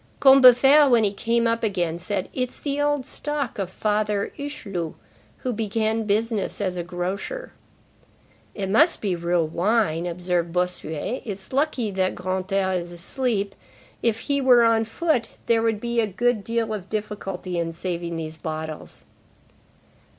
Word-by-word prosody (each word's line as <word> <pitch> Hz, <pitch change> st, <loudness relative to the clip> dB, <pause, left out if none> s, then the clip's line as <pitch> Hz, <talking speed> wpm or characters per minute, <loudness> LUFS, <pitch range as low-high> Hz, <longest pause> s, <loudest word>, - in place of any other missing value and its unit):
Combeferre 270 Hz, +2 st, +7 dB
when 235 Hz, -3 st, +5 dB
he 205 Hz, -1 st, +1 dB
came 230 Hz, +3 st, 0 dB
up 230 Hz, 0 st, +1 dB
again 175 Hz, -6 st, -1 dB
said:—"It's 205 Hz, +7 st, -3 dB
the 285 Hz, 0 st, -2 dB
old 290 Hz, -2 st, +1 dB
stock 290 Hz, -6 st, -3 dB
of 190 Hz, -2 st, -2 dB
Father 210 Hz, 0 st, -1 dB
Hucheloup, 200 Hz, -, -5 dB, 0.4 s
who 255 Hz, -2 st, -3 dB
began 220 Hz, +1 st, -1 dB
business 215 Hz, 0 st, 0 dB
as 185 Hz, -3 st, -1 dB
a 175 Hz, -, -2 dB
grocer."—"It 195 Hz, -, -8 dB
must 305 Hz, -, +5 dB
be 195 Hz, -4 st, -1 dB
real 170 Hz, 0 st, +1 dB
wine," 175 Hz, -1 st, +1 dB
observed 175 Hz, -1 st, -1 dB
Bossuet. 180 Hz, -, -2 dB
"It's 200 Hz, 0 st, -7 dB
lucky 270 Hz, -6 st, 0 dB
that 185 Hz, -1 st, 0 dB
Grantaire 190 Hz, +1 st, -1 dB
is 175 Hz, 0 st, -9 dB
asleep. 200 Hz, +3 st, -2 dB, 0.5 s
If 225 Hz, -1 st, +1 dB
he 280 Hz, -1 st, 0 dB
were 250 Hz, -3 st, +6 dB
on 225 Hz, -1 st, +3 dB
foot, 250 Hz, +2 st, 0 dB
there 230 Hz, -1 st, +3 dB
would 225 Hz, -2 st, +1 dB
be 235 Hz, +1 st, -1 dB
a 220 Hz, -, 0 dB
good 220 Hz, +2 st, 0 dB
deal 230 Hz, 0 st, -1 dB
of 195 Hz, -3 st, -6 dB
difficulty 195 Hz, -4 st, -4 dB
in 165 Hz, 0 st, -1 dB
saving 170 Hz, 0 st, -4 dB
those 160 Hz, -1 st, -6 dB
bottles." 155 Hz, -1 st, -6 dB
210 Hz, 145 wpm, -24 LUFS, 180-235 Hz, 0.5 s, Combeferre